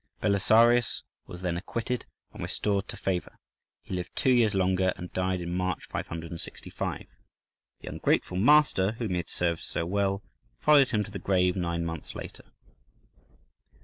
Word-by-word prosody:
Belisarius 115 +4 +4 0.2
was 90 +1 -9
then 85 -2 0
acquitted 115 +6 -3 0.3
and - - -9
restored 100 -1 -1
to - - -7
favour: 90 -2 -2 0.5
he - - -7
lived 90 -1 -4
two 130 - +3
years 115 -5 +4
longer, 95 0 +2
and 90 - -8
died 95 0 0
in 85 0 -4
March, 90 -1 -2
565.(14) 85 0 -5 0.8
The - - -11
ungrateful 90 - 0
master 110 -4 +5
whom 115 -3 -3
he 90 - +1
had 85 - -4
served 85 -2 -1
so 85 - -3
well 100 +2 0 0.4
followed 145 -3 +6
him 105 -3 +1
to 105 - -10
the 100 - -5
grave 90 -1 +2
nine 85 -2 -1
months 80 -2 -6
later. - - -8
95 Hz, 150 wpm, -28 LUFS, 90-110 Hz, 0.8 s, followed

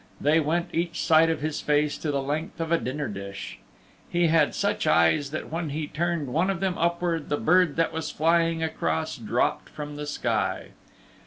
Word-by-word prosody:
They 150 +3 +3
went 165 +3 -1
each 170 0 -1
side 160 0 +5
of 160 -2 -1
his 155 0 -2
face 150 0 +1
to 155 - -3
the 140 -1 -1
length 155 +5 -3
of 165 0 -3
a 170 - +4
dinner 140 +3 -3
dish. 100 -2 -7 0.5
He 175 -1 +2
had 155 -2 +3
such - - 0
eyes 140 - +3
that 155 +1 -6
when 165 -1 -2
he 150 +2 -3
turned 170 -2 -2
one 175 +5 +2
of 190 -3 -1
them 190 -2 0
upward 170 -1 -1
the 145 - +1
bird 175 -1 +3
that 165 0 +1
was 160 0 -3
flying 165 0 +2
across 80 - -1
dropped - - -1
from 150 -1 -7
the 150 0 -5
sky. 110 -9 -1
155 Hz, 190 wpm, -26 LUFS, 145-165 Hz, 0.5 s, side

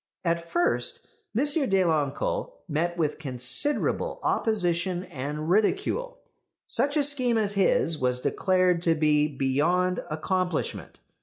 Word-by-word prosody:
At 170 0 -1
first 345 - 0 0.3
M. 260 - +3
Deloncle 195 - +1
met 170 +2 -1
with 155 -2 -1
considerable 155 - -1
opposition 180 -4 0
and 150 -2 -5
ridicule. 400 - 0 0.5
Such 285 +2 0
a 295 - +3
scheme 255 -5 +2
as 205 -2 0
his 180 -5 +2
was 125 -1 0
declared 185 +3 +1
to 165 -1 +3
be 150 -1 +3
beyond 155 +7 +1
accomplishment. 180 +2 -2
175 Hz, 110 wpm, -26 LUFS, 155-220 Hz, 0.5 s, M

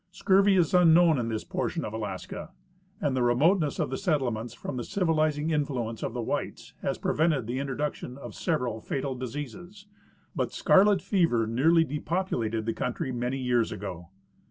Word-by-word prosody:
Scurvy 195 +2 +3
is 175 -2 +2
unknown 170 -3 +6
in 115 -1 -2
this 110 -1 -3
portion - - -3
of 105 - -6
Alaska, 95 -5 -5 0.5
and 140 -3 0
the 130 - +1
remoteness 145 +6 +3
of - - -1
the 130 - -3
settlements 125 - -1
from 130 - -6
the 120 - -3
civilizing 155 - 0
influence 130 -7 -2
of 115 - -4
the 120 - -2
whites - - -4
has - - -1
pre - - -1
vented 155 -6 +1
the 120 +4 -3
introduction 140 -1 -3
of 140 - -9
several 125 - -1
fatal 135 +3 -3
diseases, 145 - -7 0.5
but - - -1
scarlet 200 0 +4
fever 170 - +2
nearly 155 +9 +3
depopulated 145 - -2
the 115 - -1
country 125 +1 -3
many 125 +2 -2
years 125 -3 +1
ago. 95 -4 -7
135 Hz, 165 wpm, -28 LUFS, 120-165 Hz, 0.5 s, unknown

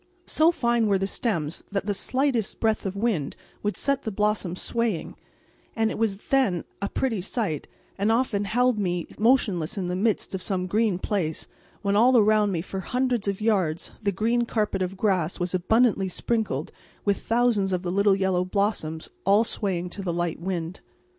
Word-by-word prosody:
So 320 +2 +4
fine 235 -7 +1
were 200 -1 +3
the 195 - -1
stems 180 - -2
that 195 -1 -1
the 205 - 0
slightest 255 +1 0
breath 220 -2 +1
of 190 - -4
wind 200 -10 -1 0.3
would 210 0 -2
set 275 -1 +1
the 220 - -4
blossoms 210 -3 0
swaying, 230 -7 -2 0.6
and 225 -1 +1
it - - -4
was 215 -4 +1
then 215 -7 +1 0.2
a 200 - -1
pretty 230 -8 -1
sight, 190 - -2 0.3
and 205 +3 +2
often 225 -4 +1
held 245 +2 +2
me 175 -3 -1
motionless 210 -8 +2
in 180 -2 -2
the 180 - -1
midst 210 +2 0
of 190 - -3
some 185 -1 -1
green 210 0 +1
place, 180 -5 -2 0.4
when 200 0 +1
all 245 +4 +6
around 215 -1 +4
me 165 -3 -2
for 190 0 -5
hundreds 245 +1 -1
of 200 +1 -1
yards 190 -8 0
the 205 -2 +1
green 230 +5 +1
carpet 210 -4 0
of 185 +1 -2
grass 185 -5 0
was 175 +1 -2
abundantly 200 +2 +3
sprinkled 190 - -2 0.3
with 200 -1 +2
thousands 225 -4 +2
of 180 0 -1
the 175 - -2
little 200 +1 +4
yellow 190 -2 +1
blossoms 185 -5 -1 0.2
all 200 +3 +5
swaying 190 -6 -2
to 200 - -5
the 185 -3 -2
light 170 -1 -2
wind. 175 -1 -3
200 Hz, 180 wpm, -25 LUFS, 185-225 Hz, 0.6 s, all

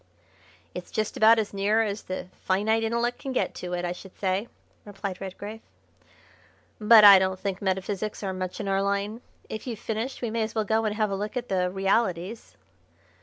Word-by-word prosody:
"It's - - -7
just 215 -1 -2
about 225 +1 +6
as 215 -2 -1
near 205 +3 +2
as 210 -1 -3
the 185 0 -6
finite 210 +4 +1
intellect 235 +2 -1
can 270 - -5
get - - 0
to 180 0 -6
it, 175 0 -2
I 175 - -2
should 180 +1 -10
say," 195 +3 -1 0.4
replied 200 -2 -6
Redgrave. 205 +3 -7 1.2
"But 215 0 +8
I 200 -2 +11
don't 190 0 -1
think 195 -2 -3
metaphysics 195 +2 -2
are 190 -1 -2
much 185 -1 -5
in - - -4
our 195 0 +1
line. 200 +3 -1 0.3
If 220 +3 -7
you've 235 -3 -4
finished 225 +5 -4
we 230 - -1
may 230 0 -1
as 220 0 -3
well 220 -1 0
go 220 +2 +1
and 210 -1 -1
have 215 -2 0
a - - 0
look 210 +5 -4
at 245 0 -4
the 180 -1 +1
realities." 195 - -1
205 Hz, 195 wpm, -26 LUFS, 190-220 Hz, 1.2 s, I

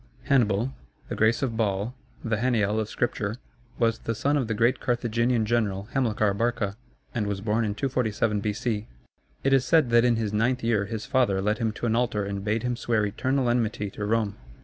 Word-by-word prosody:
] - - -29
Hannibal 120 -1 +3 0.4
(the - - -3
grace 110 +4 +2
of 120 -4 -1
Baal, 105 +1 0 0.3
the 115 -2 0
Hanniel 110 -3 +1
of 110 -1 -2
Scripture) 110 -3 -1 0.4
was 115 -1 +1
the 115 - -3
son 140 +7 +1
of 135 -5 0
the 110 - -1
great 120 +4 +2
Carthaginian 120 -1 +1
general 105 -3 0
Hamilcar 110 -6 +1
Barca, 105 -2 -1 0.4
and 105 -4 -1
was 100 -1 -2
born 110 +3 0
in 105 -2 -1
247 110 -5 0
B.C. 105 +1 -2 0.6
It 135 - +3
is 135 -1 +5
said 150 -3 +3
that 120 0 +6
in 120 -1 +4
his 110 -2 -2
ninth 120 +4 +1
year 110 -3 +2
his 110 +2 -5
father 125 -7 +2
led 105 +3 0
him 115 -2 0
to 120 - -5
an 115 -1 +2
altar 115 -4 0
and 100 0 -4
bade 110 +2 0
him 125 -1 0
swear 115 -3 0
eternal 130 +5 0
enmity 110 -4 0
to 105 - -6
Rome. 105 -1 0
115 Hz, 200 wpm, -26 LUFS, 105-120 Hz, 0.6 s, that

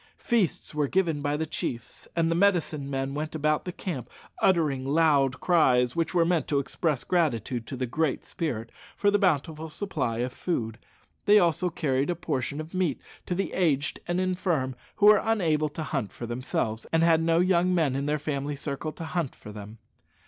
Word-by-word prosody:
Feasts 225 -11 0
were 150 -1 +1
given 165 -3 +1
by 145 +1 0
the 160 - -1
chiefs, 120 -5 -5
and 165 -1 +2
the - - +2
medicine 170 -7 +1
men 135 0 -2
went 155 +2 -4
about 155 0 +1
the 180 - -3
camp 170 -8 -5 0.3
uttering 155 -8 +2
loud 140 -2 +3
cries, 125 -8 +3
which 165 -1 0
were 170 -2 +3
meant 170 -4 +1
to 145 - +1
express 140 0 -1
gratitude 125 - 0
to 135 - -5
the 130 - -1
Great 150 +4 -1
Spirit 115 -9 -4 0.3
for 205 0 +3
the 205 - +3
bountiful 160 -3 0
supply 150 - -2
of 125 +1 -2
food. 115 -11 -3 0.5
They 210 0 +7
also 175 -1 +3
carried 140 -4 0
a 175 - +1
portion 145 -3 -3
of 155 +3 -7
meat 180 -7 0 0.3
to 180 - -1
the 195 - -2
aged 150 -6 +1
and 175 +1 0
infirm 180 -8 0 0.2
who 205 - +2
were 210 -1 +8
unable 165 -9 +1
to 155 +2 -5
hunt 135 -9 -2
for 120 - -7
themselves, 120 -2 -3
and 165 0 +3
had 165 -1 +4
no 165 0 +3
young 180 0 +3
men 150 -6 +2
in 140 +1 -1
their 150 +1 +1
family 145 -1 -3
circle 140 +2 -4
to - - -8
hunt 160 -4 -2
for 105 - -11
them. 105 +1 -9
155 Hz, 190 wpm, -27 LUFS, 135-175 Hz, 0.5 s, were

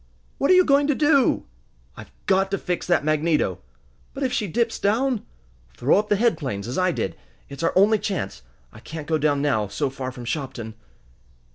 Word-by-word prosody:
"What 280 - +1
are 370 - +7
you 365 0 +6
going 280 0 +4
to 295 - +2
do?" 290 -3 +3 0.5
"I've - - -11 0.2
got 195 0 +2
to 195 - -1
fix 180 -2 -3
that 175 -5 +2
magneto!" 155 +1 +1 0.6
"But 275 - -3
if 255 -2 0
she 220 -5 0
dips 230 +5 -1
down?" 230 +3 +1 0.5
"Throw 140 +10 +3
up 210 0 -3
the 205 - +4
head 230 +3 +2
planes 115 -9 -4
as 125 - -4
I 185 -1 +2
did. 95 - -3 0.3
It's 140 -1 -8
our 165 - +2
only 210 +3 +5
chance! 175 - -3 0.3
I - - -12
can't 160 -2 -8
go 155 0 0
down 145 -1 +1
now, 110 -8 +1
so 140 +6 -2
far 130 -1 -5
from 125 -1 -9
Shopton!" 120 -4 -4
175 Hz, 200 wpm, -23 LUFS, 140-225 Hz, 0.6 s, are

